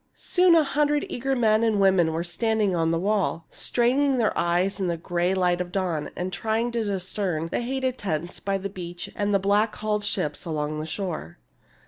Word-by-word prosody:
Soon 360 -2 +4
a 320 - +6
hundred 295 +1 +1
eager 270 +2 -1
men 220 -2 +3
and 220 -3 +2
women 190 -4 +4
were 165 +1 -2
standing 205 +3 0
on 165 -1 +1
the 165 - +1
wall, 190 -3 0
straining 260 +3 +1
their 225 -3 +1
eyes 180 +3 +1
in 190 - 0
the 170 -1 -1
gray 175 +2 0
light 180 -1 +2
of 175 0 -5
dawn, 180 -6 -1
and 180 +1 -4
trying 225 +5 -1
to 235 -1 -1
discern 185 -4 -2
the - - -1
hated 260 +1 -2
tents 175 -3 -3
by 195 0 -1
the 195 +1 -4
beach 175 -3 -7
and 205 0 0
the 200 - +4
black 205 +3 +2
hulled 210 -1 -1
ships 165 -8 -2
along 155 -2 -3
the 155 - -4
shore. 160 - -4
195 Hz, 195 wpm, -25 LUFS, 175-225 Hz, -, a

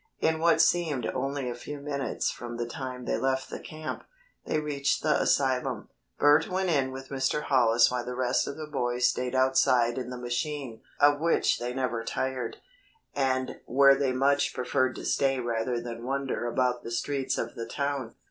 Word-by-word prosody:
In 160 0 +1
what 165 0 +4
seemed 155 -9 +1
only 135 0 -2
a 120 - -2
few 145 +4 -7
minutes 140 -2 -2
from 120 -1 -7
the 120 - -2
time 130 -1 -6
they - - 0
left 130 0 -1
the - - -5
camp, 155 0 -6 0.4
they 155 - +1
reached 145 -2 -1
the 155 - +2
asylum. 130 -2 +1 0.3
Bert 145 +2 +4
went 185 -1 0
in 135 -4 +1
with 135 0 -8
Mr. 135 +2 0
Hollis 120 -3 +4
while 125 -1 -1
the 125 +1 -5
rest 125 0 +1
of 140 - -5
the 155 - -5
boys 125 -4 -1
stayed 125 0 -1
outside 130 -2 +3
in 125 -1 -5
the 125 - -6
machine 125 0 -3 0.2
of 145 0 +5
which 170 +1 +2
they 120 +1 -3
never 125 -3 -1
tired, 130 0 -3 0.6
and 130 -2 -1
where 140 +2 +6
they 135 -1 +1
much 140 +2 +2
preferred 130 0 0
to - - -7
stay 135 -1 +1
rather 120 0 -1
than 115 0 -7
wander 135 -1 -2
about 125 0 0
the - - -7
streets 135 +3 -1
of - - -3
the 115 -1 -6
town. 140 -3 -3
130 Hz, 185 wpm, -28 LUFS, 125-140 Hz, 0.6 s, where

